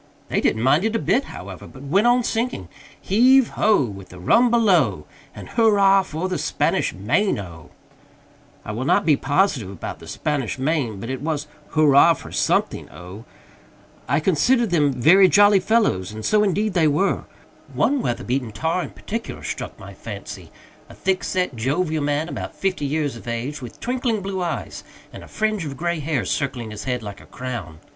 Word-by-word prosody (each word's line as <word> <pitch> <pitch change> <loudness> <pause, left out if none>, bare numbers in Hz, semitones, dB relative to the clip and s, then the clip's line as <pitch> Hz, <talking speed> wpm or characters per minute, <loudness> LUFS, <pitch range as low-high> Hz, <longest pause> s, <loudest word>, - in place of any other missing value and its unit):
They - - 0
didn't 110 - +1
mind 145 +7 +3
it 220 +1 0
a - - +4
bit, 260 +4 +1
however, 95 0 -9
but 130 - -13
went 195 +11 +2
on 245 0 +4
singing 225 - -2 0.3
"Heave 250 +5 +4
ho! 210 -8 +2
With 100 -5 -8
the 90 - -12
rum 230 - +4
below, 175 - +2 0.3
And - - -10
hurrah 200 -4 +4
for 180 -1 -4
the 185 - -2
Spanish - - 0
Main 120 - 0
O!" 85 -5 -9 1.0
I - - -4
will 115 +4 -3
not - - +2
be 155 -3 +5
positive 140 - 0
about 95 -3 -7
"the - - -13
Spanish 145 -7 -2
Main," 130 -7 -1
but 115 +6 -5
it 130 -1 -4
was 150 -1 -2 0.3
hurrah 155 +2 +6
for - - -11
something - - 0
O. 90 +6 -11 0.8
I 140 +3 +3
considered 215 - +2
them 150 -4 +3
very 165 +10 +5
jolly 205 0 +5
fellows, 190 - +1
and 110 0 -7
so 210 -1 +3
indeed 210 +1 0
they 170 -3 +3
were. 165 +7 +1 0.5
One 280 -1 +1
weather 120 - -2
beaten 125 -2 -2
tar 160 +9 -1
in - - -5
particular 230 +2 -6
struck - - -5
my - - -10
fancy - - -9 0.4
a - - -13
thick 190 -1 -1
set, 180 -8 -1
jovial 155 +6 -1
man, 145 +2 0
about - - -6
fifty 185 -6 -2
years 145 -2 -1
of 115 - -12
age, 125 +5 -4
with 120 -3 -10
twinkling 245 -4 -1
blue 190 -1 -3
eyes 175 -1 -4 0.3
and - - -9
a - - -12
fringe 215 -3 -1
of 140 -3 -6
gray 170 -1 -1
hair 150 -4 -1
circling 125 -5 -3
his 105 - -7
head 125 -3 -2
like 100 -2 -8
a - - -17
crown. 120 -11 -6
155 Hz, 185 wpm, -22 LUFS, 125-200 Hz, 1.0 s, hurrah